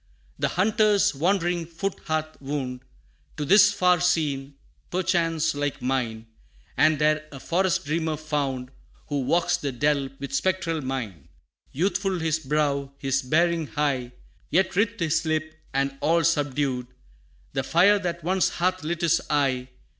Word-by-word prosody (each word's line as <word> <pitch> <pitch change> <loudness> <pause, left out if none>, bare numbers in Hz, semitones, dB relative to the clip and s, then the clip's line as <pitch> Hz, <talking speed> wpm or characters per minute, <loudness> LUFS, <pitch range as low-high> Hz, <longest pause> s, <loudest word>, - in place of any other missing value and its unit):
The - - +2
hunter's 210 +1 +3
wandering 175 +2 0
foot 180 +4 -4
hath 155 -1 -3
wound, 135 -3 -3 0.6
To 150 - -2
this 195 +5 +7
far 180 -3 +3
scene, 145 -5 0 0.3
perchance 165 -3 +1
like 145 -1 -2
mine, 120 -4 -2 0.5
And 155 0 +4
there 155 +1 +1
a 135 - -9
Forest 180 +3 0
Dreamer 160 +1 -1
found, 140 -4 -3 0.4
Who 145 -2 0
walks 170 +6 +2
the 140 - -3
dell 140 +1 +1
with 140 0 -7
spectral 175 0 0
mien. 115 - -5 0.4
Youthful 190 +4 0
his 160 -1 0
brow, 140 -2 -1
his 135 -1 0
bearing 165 +4 +1
high 135 -5 -1 0.4
Yet 190 +2 +2
writhed 205 +1 +1
his 165 0 +1
lip, 155 -1 -1 0.2
and 135 0 0
all 165 +3 +3
subdued, 140 -5 0 0.7
The 135 - 0
fire 185 +9 +4
that 170 -3 -4
once 185 +2 +2
hath 185 0 -1
lit 170 +2 -3
his 170 -1 +3
eye. 135 -4 +1
155 Hz, 140 wpm, -25 LUFS, 140-175 Hz, 0.7 s, this